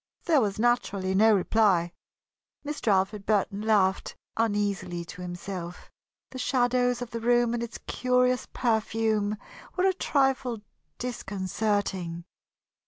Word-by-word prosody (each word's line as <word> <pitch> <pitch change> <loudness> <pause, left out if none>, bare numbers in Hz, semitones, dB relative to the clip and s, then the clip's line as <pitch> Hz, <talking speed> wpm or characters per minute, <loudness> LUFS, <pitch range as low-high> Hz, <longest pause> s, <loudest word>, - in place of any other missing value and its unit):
There 315 -5 +4
was 205 -3 -1
naturally 215 -5 +1
no 215 +2 +5
reply. 190 -3 +2 0.7
Mr. 295 -4 -5
Alfred 195 0 +2
Burton 205 -1 +1
laughed 200 -3 +2 0.2
uneasily 200 -5 -1
to 180 +2 -10
himself. 175 0 -7 0.4
The 260 - -7
shadows 245 0 +1
of 240 - -10
the 230 - -3
room 240 0 +3
and 240 - -1
its 235 -1 -5
curious 250 0 +1
perfume 220 -2 0 0.4
were 365 - +3
a 380 - +4
trifle 270 - 0 0.4
disconcerting. 195 -6 -2
220 Hz, 115 wpm, -27 LUFS, 195-245 Hz, 0.7 s, no